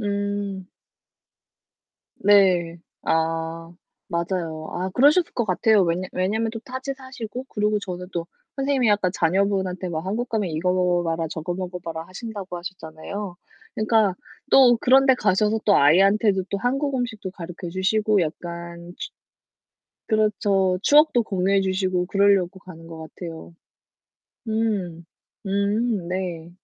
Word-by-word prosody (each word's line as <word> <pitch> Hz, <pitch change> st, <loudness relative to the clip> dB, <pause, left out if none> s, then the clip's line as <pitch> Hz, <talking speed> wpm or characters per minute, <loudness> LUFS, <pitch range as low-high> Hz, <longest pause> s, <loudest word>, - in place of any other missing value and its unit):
음. 200 Hz, -2 st, -3 dB, 1.5 s
네. 185 Hz, -4 st, +4 dB, 0.3 s
아. 165 Hz, +1 st, -1 dB, 0.4 s
맞아요. 170 Hz, -2 st, -3 dB
아 185 Hz, +2 st, -3 dB
그러셨을 300 Hz, +7 st, +4 dB
것 235 Hz, -, 0 dB
같아요. 200 Hz, +1 st, +3 dB
왜냐 175 Hz, +2 st, -1 dB
왜냐하면 215 Hz, +5 st, 0 dB
또 225 Hz, -, -6 dB
타지 260 Hz, 0 st, -5 dB
사시고 255 Hz, -2 st, -7 dB
그리고 210 Hz, 0 st, 0 dB
저는 180 Hz, -2 st, -6 dB
또 170 Hz, -1 st, -3 dB, 0.3 s
선생님이 270 Hz, -3 st, +1 dB
약간 205 Hz, -3 st, +2 dB
자녀분한테 190 Hz, +1 st, 0 dB
막 160 Hz, -1 st, -3 dB
한국 225 Hz, +6 st, -2 dB
가면 210 Hz, -5 st, -1 dB
"이거 175 Hz, +4 st, 0 dB
먹어 180 Hz, -1 st, +1 dB
봐라, 165 Hz, 0 st, -1 dB
저거 165 Hz, +3 st, -4 dB
먹어 180 Hz, 0 st, -5 dB
봐라." 165 Hz, -1 st, -7 dB
하신다고 195 Hz, -2 st, -7 dB
하셨잖아요. 180 Hz, +2 st, -7 dB, 0.4 s
그니까 215 Hz, -3 st, +2 dB, 0.3 s
또 250 Hz, -3 st, +7 dB
그런 265 Hz, +3 st, +5 dB
데 265 Hz, -, +6 dB
가셔서 210 Hz, 0 st, +1 dB
또 205 Hz, -, +4 dB
아이한테도 195 Hz, +5 st, +4 dB
또 200 Hz, -, -1 dB
한국 270 Hz, +5 st, -1 dB
음식도 225 Hz, -6 st, -3 dB
가르쳐 175 Hz, -1 st, -8 dB
주시고 205 Hz, +3 st, +1 dB
약간 170 Hz, +1 st, -6 dB
취 -, -, -6 dB, 1.0 s
그렇죠. 205 Hz, -4 st, +2 dB
추억도 295 Hz, -4 st, +5 dB
공유해 195 Hz, -1 st, +1 dB
주시고 185 Hz, -1 st, 0 dB
그럴려고 195 Hz, -1 st, +2 dB
가는 165 Hz, -3 st, -13 dB
것 165 Hz, -1 st, -9 dB
같아요. 165 Hz, +1 st, -9 dB, 0.9 s
음. 205 Hz, -7 st, -2 dB, 0.4 s
음 200 Hz, 0 st, 0 dB
네. 175 Hz, -3 st, -4 dB
190 Hz, 285 characters per minute, -23 LUFS, 175-215 Hz, 1.5 s, 또